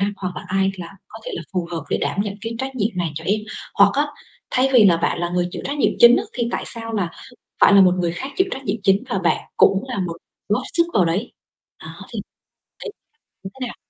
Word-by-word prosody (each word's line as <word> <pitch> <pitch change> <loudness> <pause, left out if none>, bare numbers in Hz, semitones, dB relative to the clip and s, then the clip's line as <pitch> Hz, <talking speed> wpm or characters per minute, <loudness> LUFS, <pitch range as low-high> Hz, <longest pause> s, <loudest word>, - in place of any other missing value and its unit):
năng, 200 +1 0
hoặc 180 -2 -5
là - - -5
ai 195 +1 +1
là 170 - -6 0.2
có 220 - -11
thể - - -5
là 170 - -5
phù 180 -2 -1
hợp 165 -3 -3
để - - +1
đảm 200 - -1
nhận 205 -1 -4
cái 225 +1 -4
trách 265 +1 -4
nhiệm 225 -2 0
này 175 -3 -1
cho 160 - -6
em?" 210 +4 +1 0.3
Hoặc 200 0 +6
á, 290 +1 +2 0.4
thay 260 +1 +3
vì 240 -5 +7
là 175 -4 +6
bạn 170 - -1
là 175 0 -1
người 175 0 -1
chịu - - -6
trách 285 +1 -3
nhiệm - - +3
chính 240 +1 +8
á - - 0
thì 235 -2 -2
tại - - -2
sao 225 -1 -3
là 195 -5 -1 0.5
phải 200 - +7
là 200 - +8
một 180 -1 +5
người 170 -1 0
khác 265 +11 -5
chịu 375 - +3
trách 270 - -5
nhiệm 215 -3 -1
chính 195 +3 +3
và 195 - 0
bạn 170 -3 +1 0.2
cũng 195 +1 +4
là 250 -5 -3
một 170 -3 -3 0.3
góp 205 - +1
sức 340 - +5
vào 185 - +4
đấy. 185 +8 -2 0.5
Đó - - -8 0.2
thì - - -3 0.6
thấy 455 - -6 0.5
thế 250 +7 -6
nào? 240 - -7
200 Hz, 255 wpm, -21 LUFS, 180-235 Hz, 0.6 s, chính